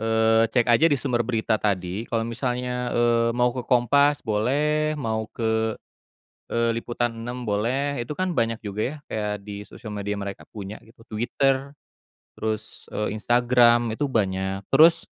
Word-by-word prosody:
eee, 110 0 +3
cek 120 +1 +2
aja 155 +8 +5
di 145 - +2
sumber 125 -3 -1
berita 110 -2 0
tadi 95 +1 -2
kalau 115 -1 0
misalnya, 125 +1 -2
eee, 115 0 +2
mau 125 0 +3
ke 125 - -4
Kompas 140 +4 +3
boleh, 150 +8 +1
mau 110 -5 -2
ke, 110 -1 0 0.9
eee, 115 0 +1
Liputan 120 0 -2
6 120 +1 -6
boleh, 120 +6 0
itu 120 - -8
kan 185 +2 -2
banyak 115 -2 0
juga 105 0 -4
ya 145 - -2
kayak 105 -1 -2
di 100 0 -6
sosial 110 0 -9
media 105 0 -3
mereka 100 -1 -6
punya 100 -1 -7
gitu. 115 0 -20
Twitter 135 +5 0 0.6
terus, 110 0 -4
eee, 105 - -2
Instagram 120 0 +4
itu 145 +4 -1
banyak. 95 -2 -1
Terus, 165 +4 +6
115 Hz, 155 wpm, -24 LUFS, 110-125 Hz, 0.9 s, Terus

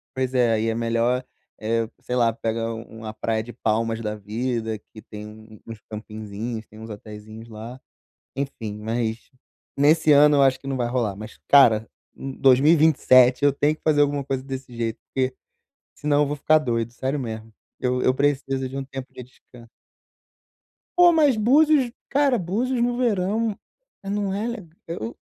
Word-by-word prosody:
Pois 130 0 -1
é, 125 -2 +3
aí, 110 +1 0
é 110 - -1
melhor, 115 +2 0 0.4
eh, 115 +1 0
sei 125 - -4
lá, 115 -2 +3
pega 115 0 -2
u 110 - -6
uma 110 -1 -8
praia 110 0 -2
de 120 +2 -10
Palmas 115 +1 -1
da 105 -1 -3
vida 110 +2 -3
que 110 - -12
tem 105 -1 -10
um 110 +1 -12 0.2
um 115 - -7
uns 110 - -9
campinzinhos, 110 +1 -6
tem 110 - -15
uns 110 +1 -9
Hoteizinhos 110 +1 -10
lá. 115 +4 -9 0.6
Enfim, 125 -6 -5
mas 115 +1 -3 0.5
nesse 155 +2 +4
ano 145 +1 +6
eu 140 - +4
acho 130 -1 +3
que 135 - -14
não 135 - -2
vai 120 -2 -1
rolar, 120 -5 -1
mas, 110 +1 -10
cara, 115 -6 +6 0.3
u 135 - -6
2027 135 -2 +5
eu 145 - +5
tenho 145 +2 +1
que - - -37
fazer 150 -2 +2
alguma 145 -1 +1
coisa 135 -1 -3
desse 130 -2 -7
jeito, 115 -1 -2 0.2
porque 130 -1 0 0.6
senão 145 0 +1
eu - - +1
vou 145 +1 -3
ficar 155 +2 +4
doido, 115 -5 -2
sério 135 +3 -2
mesmo. 110 -3 -6 0.3
Eu 125 0 0
eu 130 - +4
preciso 135 -1 0
de 135 - -8
um 135 - -3
tempo 135 -1 -8
de - - -9
descan 125 -1 -17 1.3
Pô, 355 -1 +7
mas 300 -6 +4
Búzios, 265 +3 +4 0.2
cara, 275 -2 +3
Búzios 235 +8 -1
no 240 0 +1
verão, 215 -2 0 0.5
não 200 0 -2
é 210 +4 -2
le 220 -9 -6 0.2
eu 120 -9 -5
130 Hz, 180 wpm, -23 LUFS, 115-150 Hz, 1.3 s, Pô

